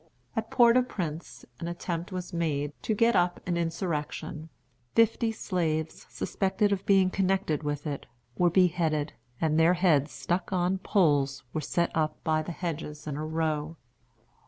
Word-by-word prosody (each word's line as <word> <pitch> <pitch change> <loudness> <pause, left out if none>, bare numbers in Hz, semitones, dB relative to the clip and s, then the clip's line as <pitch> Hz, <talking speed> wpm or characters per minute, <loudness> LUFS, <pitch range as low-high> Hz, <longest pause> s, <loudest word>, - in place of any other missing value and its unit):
At 225 0 -2
Port 235 0 +6
au - - +6
Prince 170 -10 -5
an 170 - -4
attempt 175 +1 -4
was 185 0 -5
made 150 -4 -1
to 220 - 0
get 230 +2 +3
up 175 0 +2
an 180 -2 0
insurrection. 165 -2 -3 0.5
Fifty 230 0 +3
slaves, 160 -7 -2
suspected 205 +2 0
of 195 -1 0
being 190 -2 +5
connected 190 -5 +1
with 145 -1 -3
it, 145 -2 -4 0.3
were 175 +3 +3
beheaded, 170 -4 +2 0.3
and 160 0 +2
their 165 +3 +5
heads, 155 -5 +3
stuck 175 +3 -2
on 185 0 +1
poles, 145 -9 +2
were 155 - -1
set 170 +4 -1
up 155 -1 0
by 155 0 +2
the 155 - -5
hedges 155 -3 -5
in 150 -2 -3
a 150 - -3
row. 155 0 -2
170 Hz, 160 wpm, -28 LUFS, 155-185 Hz, 0.5 s, Port